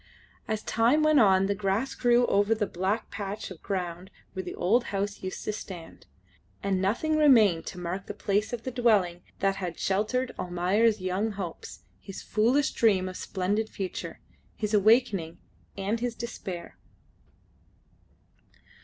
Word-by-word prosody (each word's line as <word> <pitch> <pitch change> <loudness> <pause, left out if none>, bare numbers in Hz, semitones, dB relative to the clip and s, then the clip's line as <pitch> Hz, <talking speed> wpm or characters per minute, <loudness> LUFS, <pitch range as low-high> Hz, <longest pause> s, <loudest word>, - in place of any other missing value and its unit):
As 220 -1 -2
time 240 +7 +3
went 310 -2 +5
on 195 -4 +5
the 200 - +1
grass 200 +5 -1
grew 245 0 +3
over 205 +1 +2
the 215 - 0
black 195 +5 -2
patch 200 -1 -5
of 175 - -10
ground 180 -2 -4 0.2
where 190 - -3
the 180 - -7
old 235 +7 +2
house 200 0 -3
used 185 0 -5
to 215 - -1
stand, 180 -5 -9 0.6
and 195 -2 0
nothing 245 +11 +1
remained 225 - +5
to 185 - -6
mark 180 +3 -4
the - - -6
place 205 +2 0
of 240 -2 -4
the 255 - -4
dwelling 210 -8 +2 0.2
that 195 0 +2
had 180 -3 -4
sheltered 220 +6 0
Almayer's 185 +5 +1
young 190 +4 -1
hopes, 185 -4 -7 0.2
his 195 - -9
foolish 250 +7 +2
dream 195 -5 +2
of 185 - -6
splendid 205 +5 -1
future, 190 -2 -5 0.4
his 210 0 -3
awakening, 205 -6 +3 0.4
and 200 +4 -1
his 240 0 -2
despair. 190 -7 -7
200 Hz, 150 wpm, -28 LUFS, 185-225 Hz, 0.6 s, went